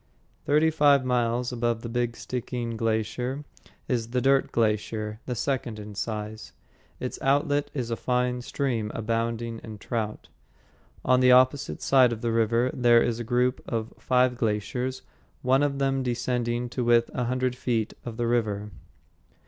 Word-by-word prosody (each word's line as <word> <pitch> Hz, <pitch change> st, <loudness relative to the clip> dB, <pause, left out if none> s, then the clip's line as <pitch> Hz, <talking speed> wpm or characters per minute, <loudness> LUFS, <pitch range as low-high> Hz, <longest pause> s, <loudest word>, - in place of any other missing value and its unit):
Thirty 155 Hz, +2 st, +3 dB
five 145 Hz, -4 st, +4 dB
miles 120 Hz, 0 st, 0 dB
above 120 Hz, -1 st, -1 dB
the -, -, -4 dB
Big 120 Hz, 0 st, -1 dB
Stickeen 120 Hz, -2 st, -4 dB
Glacier 115 Hz, +5 st, -1 dB, 0.4 s
is 115 Hz, -3 st, -1 dB
the 125 Hz, +2 st, 0 dB
"Dirt 135 Hz, +1 st, +3 dB
Glacier," 110 Hz, -1 st, -1 dB
the 125 Hz, -, -2 dB
second 120 Hz, -2 st, -2 dB
in 105 Hz, 0 st, -8 dB
size. 105 Hz, +1 st, -5 dB, 0.5 s
Its -, -, -4 dB
outlet 145 Hz, +1 st, +2 dB
is 120 Hz, -4 st, -3 dB
a -, -, +1 dB
fine 125 Hz, 0 st, 0 dB
stream, 120 Hz, -5 st, -2 dB
abounding 115 Hz, +1 st, -2 dB
in 110 Hz, -2 st, -8 dB
trout. 110 Hz, 0 st, -4 dB, 0.8 s
On 130 Hz, 0 st, +4 dB
the 125 Hz, 0 st, +5 dB
opposite 130 Hz, +2 st, +3 dB
side 130 Hz, -3 st, +5 dB
of 115 Hz, -1 st, -4 dB
the 115 Hz, -, 0 dB
river 115 Hz, +2 st, +2 dB
there 120 Hz, -2 st, +5 dB
is 120 Hz, -1 st, -1 dB
a -, -, -3 dB
group 125 Hz, +2 st, +1 dB
of 115 Hz, -1 st, -3 dB
five 125 Hz, -1 st, +2 dB
glaciers, 120 Hz, +4 st, -2 dB, 0.4 s
one 130 Hz, +2 st, +3 dB
of 145 Hz, -1 st, +1 dB
them 135 Hz, -1 st, +1 dB
descending 120 Hz, -1 st, -1 dB
to 125 Hz, +1 st, -2 dB
within 120 Hz, 0 st, +3 dB
a 125 Hz, -, 0 dB
hundred 125 Hz, +1 st, 0 dB
feet 115 Hz, -3 st, -1 dB
of 115 Hz, -2 st, -7 dB
the 120 Hz, -, 0 dB
river. 105 Hz, -3 st, 0 dB
120 Hz, 155 wpm, -26 LUFS, 115-130 Hz, 0.8 s, the